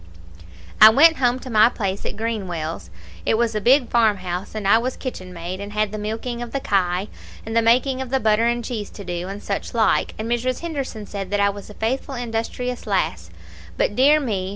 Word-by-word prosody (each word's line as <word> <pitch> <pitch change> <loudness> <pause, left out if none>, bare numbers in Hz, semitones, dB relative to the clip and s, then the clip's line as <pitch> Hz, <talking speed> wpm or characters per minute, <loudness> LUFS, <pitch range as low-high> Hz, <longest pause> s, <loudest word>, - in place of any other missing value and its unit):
"I 215 - +12
went 320 +8 +6
home 245 -1 +2
to 260 - -8
my 220 +1 +6
place 200 -5 -3
at - - -6
Greenwells. 175 - -4 0.3
It 220 - +1
was 230 -1 +1
a 215 - -2
big 255 +3 +4
farmhouse, 200 -5 0
and 210 -2 -2
I 225 +3 +6
was 255 +2 -3
kitchenmaid, 185 -7 -6
and 205 +1 -7
had 215 -1 0
the 215 - -5
milking 225 +3 -4
of 240 -1 -7
the 275 - 0
kye, 190 -4 0 0.4
and 225 +1 -5
the 230 - +5
making 255 +3 +2
of 260 - -5
the 265 +1 +1
butter 220 0 +2
and 240 0 -1
cheese 220 -5 -4
to 200 - -10
do, 175 0 -4
and 200 +2 -7
such 200 +3 -4
like, 225 -1 +2
and 220 - -4
Mrs. 240 +2 -1
Henderson 275 -10 -5
said 195 -2 -6
that 205 +1 0
I 200 0 +3
was 200 +1 -10
a 210 - -11
faithful 265 +4 -2
industrious 240 +1 -4
lass. 90 - -1 0.5
But, 205 - 0
dear 285 +5 +5
me! 200 -9 -2
220 Hz, 210 wpm, -22 LUFS, 200-245 Hz, 0.5 s, I